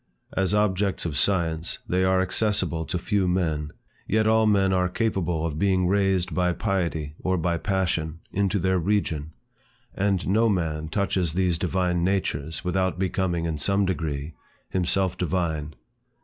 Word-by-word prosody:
As 95 +1 +1
objects 100 -2 +1
of 80 -4 -2
science, 85 0 +1
they 90 +1 +1
are 95 0 +3
accessible 95 -4 0
to 90 - -2
few 95 +1 0
men. 80 -5 0 0.4
Yet 110 +1 +2
all 110 0 +4
men 100 -2 +3
are 90 -1 +2
capable 90 -6 -1
of 80 -2 -3
being 95 -1 +2
raised 95 -2 +1
by 90 -1 +1
piety 85 -6 -2
or 95 0 0
by 85 0 0
passion, 85 -5 -1
into 100 0 +1
their 95 0 +1
region. 80 -5 -1 0.6
And 100 -2 0
no 110 +4 +3
man 80 -5 -1
touches 95 -2 0
these 90 -2 +1
divine 90 -1 0
natures, 80 -5 -1
without 95 0 0
becoming, 90 -2 -1
in 80 -2 -2
some 100 +6 +2
degree, 80 -4 -3 0.4
himself 95 0 0
divine. 80 -4 -1
90 Hz, 150 wpm, -25 LUFS, 80-95 Hz, 0.6 s, all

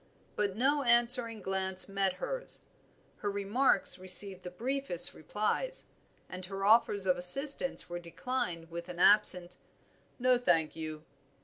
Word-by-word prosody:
But 200 -2 -3
no 280 +4 0
answering 240 -3 +4
glance 190 0 0
met 195 -1 -2
hers; - - -2 0.6
her 205 - -5
remarks 200 +1 -2
received 185 +1 -2
the 180 - -9
briefest 235 -3 +1
replies, 215 - -5 0.4
and 185 0 -11
her 195 0 -7
offers 210 -2 +2
of 180 -1 0
assistance 270 +10 +5
were 175 0 -8
declined 170 -2 -6
with 170 +1 -9
an 175 - -10
absent 180 -2 +3 0.6
"No, 250 0 0
thank 165 -9 -1
you." 155 -1 -9
195 Hz, 130 wpm, -29 LUFS, 180-240 Hz, 0.6 s, assistance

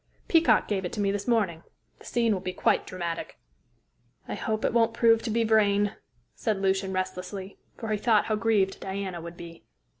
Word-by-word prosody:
Peacock 320 -10 +4
gave 195 -2 -1
it 180 - -3
to - - -4
me 200 -1 +2
this 200 0 -4
morning. 205 -9 +1 0.4
The - - -16
scene 230 -2 +2
will 190 - -1
be 185 0 -4
quite - - +1
dramatic." 170 -2 -5 0.9
"I - - -4
hope 220 -1 -2
it - - +1
won't 230 -1 +3
prove 230 -1 +4
to 230 - -4
be 230 +1 +1
Vrain," 205 -2 +3 0.4
said 215 -3 -1
Lucian 190 0 0
restlessly, 185 +1 -4 0.2
for 225 - -6
he 210 - 0
thought 220 -2 +3
how 215 - 0
grieved 210 -3 +1
Diana 190 -2 -4
would 170 +1 -9
be. 170 -1 -11
200 Hz, 190 wpm, -27 LUFS, 190-225 Hz, 0.9 s, Peacock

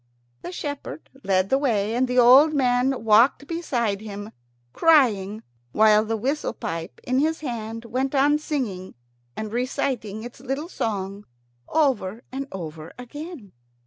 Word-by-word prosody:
The - - -6
shepherd 295 -2 -6
led 190 0 +1
the 270 - +4
way, 220 -6 0
and 255 +2 +1
the 250 0 -2
old 265 +6 +7
man 250 -2 +1
walked 225 +6 +4
beside 240 - -2
him, 205 0 -7 0.4
crying, 220 - +3 0.3
while 215 0 +5
the 225 +1 -2
whistle 275 +7 -2
pipe 165 -6 -6
in 255 +1 +1
his 315 +2 0
hand 230 -4 -5
went 260 +4 -2
on 290 +2 +4
singing 235 -12 -4 0.4
and 215 0 -5
reciting 245 -4 -2
its 240 0 -9
little 275 +6 -4
song 200 - -3 0.4
over 250 -8 0
and 270 +1 -4
over 160 -3 -7
again. 270 - -9
245 Hz, 140 wpm, -24 LUFS, 210-275 Hz, 0.4 s, old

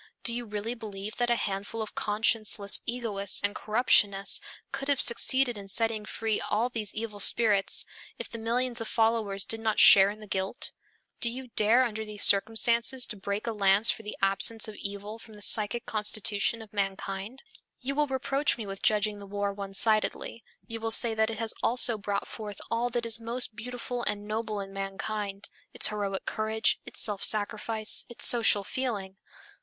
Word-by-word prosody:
Do 235 - +2
you 240 0 -4
really 210 +2 -4
believe 210 -3 -8
that 240 0 0
a 240 - +2
handful 200 +1 -5
of 215 -1 -5
conscienceless 210 -1 +2
egoists 215 -5 0
and 205 0 -1
corruptionists 205 -3 +3 0.3
could 275 - -6
have 285 -2 +1
succeeded 245 -1 +4
in 200 - -11
setting 220 +1 -1
free 220 0 -3
all 225 +4 0
these 220 -4 -5
evil 215 -2 -5
spirits, 205 -1 +3 0.3
if - - -5
the 230 - -9
millions 240 +1 -1
of 225 - -4
followers 220 -4 +1
did 225 - -3
not 220 -1 -2
share 195 0 +7
in 210 +1 -8
the 215 - -11
guilt? 190 +3 -2 0.5
Do 235 - +3
you 255 +1 -8
dare 225 +4 +4
under 220 -3 -4
these 210 -1 -3
circumstances 230 +5 +4
to 215 - -7
break 200 +1 -5
a 230 - -2
lance 200 0 +4
for - - -7
the 210 -1 -8
absence 195 +3 +3
of 215 - -8
evil 205 +2 -7
from 220 -1 -14
the 205 - -14
psychic 215 +3 +1
constitution 210 0 -1
of 215 0 -18
mankind? 195 +4 -5 0.4
You 270 +2 -4
will 295 +1 0
reproach 270 +2 -1
me 225 - -6
with 195 -1 -8
judging 210 -1 0
the 200 - -11
war 200 0 -3
one 195 -1 -8
sidedly, 220 +2 +1 0.2
you 230 -1 -7
will 225 0 -3
say 225 0 +4
that 220 0 0
it 225 - -6
has 225 0 -3
also 240 -2 +2
brought 200 -1 -4
forth 210 -3 -9
all 235 +1 -1
that 240 -1 -3
is 230 0 -1
most 230 0 -2
beautiful 245 +2 -6
and 205 0 -3
noble 215 -1 -4
in 195 0 -10
mankind, 195 +1 -5 0.3
its - - +6
heroic 200 -2 -4
courage, 220 +1 -1
its - - -6
self 205 -3 0
sacrifice, 215 +1 +2
its 240 - +2
social 225 -4 +5
feeling. 200 -5 -5
215 Hz, 185 wpm, -27 LUFS, 205-230 Hz, 0.5 s, share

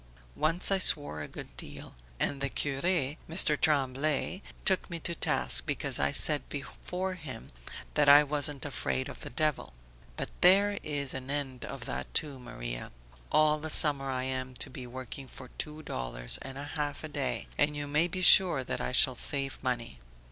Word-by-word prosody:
Once 165 +5 +3
I 195 - +3
swore 145 - +4
a 75 - -5
good - - -10
deal, 70 +3 -7 0.3
and 140 - 0
the 140 - 0
cure, 135 0 -3
Mr. 160 -1 +1
Tremblay, 145 +4 0 0.2
took 190 -2 +2
me 170 -1 -5
to 170 - -1
task - - +1
because - - -1
I 70 0 +1
said 150 -2 +4
before 180 +6 -5
him 150 -10 -9 0.4
that 145 -1 +3
I 145 +1 +9
wasn't 145 -1 -2
afraid 130 -2 -3
of - - -9
the - - -8
devil. 150 - -2 0.4
But - - -3
there 200 +3 +5
is 145 -2 -1
an 130 0 -6
end 140 -3 -3
of - - -8
that 65 +1 -5
too, 145 -4 0
Maria. - - -7 0.4
All 155 0 +3
the 160 +1 -6
summer 140 -3 +2
I 130 -1 -2
am 130 -1 -4
to 135 - -4
be 125 -1 -8
working 130 +2 -8
for 130 0 -10
two 155 0 -3
dollars - - -2
and 135 0 -8
a 145 +1 -7
half 145 -1 -3
a - - -4
day 145 -3 -3
and 145 0 +1
you 145 - -3
may 150 +4 +1
be 185 +1 -4
sure 175 -7 +8
that - - -4
I - - -3
shall 130 0 +5
save 135 +1 -2
money. 120 - -3
145 Hz, 185 wpm, -29 LUFS, 130-155 Hz, 0.4 s, I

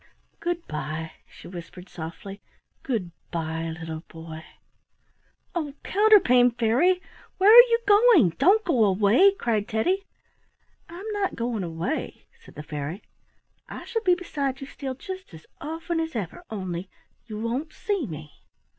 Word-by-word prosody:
"Good 345 0 -3
bye," 155 +2 -5 0.2
she - - -13
whispered 180 +1 -10
softly. 180 +4 -8 0.4
"Good 215 -10 -2 0.2
bye! 165 -1 -3
little 160 -1 -5
boy." 160 -1 -9 1.1
"Oh, 300 -5 -3
Counterpane 375 - +5
Fairy! 255 +11 +3 0.4
where 390 +3 +6
are 485 +2 +11
you 465 0 +3
going? 410 - +6
Don't 395 +9 +4
go 255 -10 +3
away!" 210 - +5
cried 220 - -1
Teddy. 350 - 0 0.9
"I'm 350 +4 -9
not 410 -2 -1
going 230 -2 -2
away," 170 - -4 0.2
said - - -16
the 150 - -7
fairy. 150 +5 -5 0.7
"I - - -8
shall 455 - -2
be 365 -4 +4
beside 280 -7 -3
you 275 - -6
still 270 -1 -6
just 375 - -8
as 155 - -14
often 325 +2 -3
as 325 -3 -3
ever, 215 - -5
only 185 -3 -5 0.4
you 215 -2 -6
won't 245 +8 -3
see 400 - -2
me." 150 -3 -9
240 Hz, 140 wpm, -25 LUFS, -, 1.1 s, are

